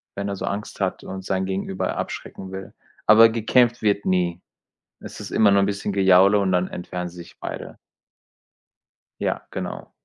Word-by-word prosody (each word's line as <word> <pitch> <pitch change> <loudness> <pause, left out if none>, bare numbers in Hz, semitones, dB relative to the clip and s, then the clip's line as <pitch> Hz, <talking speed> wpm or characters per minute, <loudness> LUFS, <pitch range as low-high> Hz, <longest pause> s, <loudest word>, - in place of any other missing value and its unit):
wenn 100 0 -3
er 100 - -2
so - - -4
Angst 100 0 -5
hat 95 - -1
und 95 -1 -6
sein 95 0 -1
Gegenüber 95 0 -2
abschrecken 95 -1 -6
will. 95 0 -8 0.3
Aber 115 +2 +8
gekämpft 120 +2 +2
wird 100 -1 +1
nie. 90 -1 0 0.6
Es - - -10
ist - - -7
immer 105 -2 +4
nur 100 0 +5
'n - - +3
bisschen 100 0 -2
Gejaule 95 +1 +5
und 95 -2 +1
dann 90 0 +2
entfernen 90 0 -5
sie 90 - -15
sich 85 0 -12
beide. - - -7 1.4
Ja, - - -2
genau. - - -6
95 Hz, 175 wpm, -23 LUFS, 95-100 Hz, 1.4 s, Aber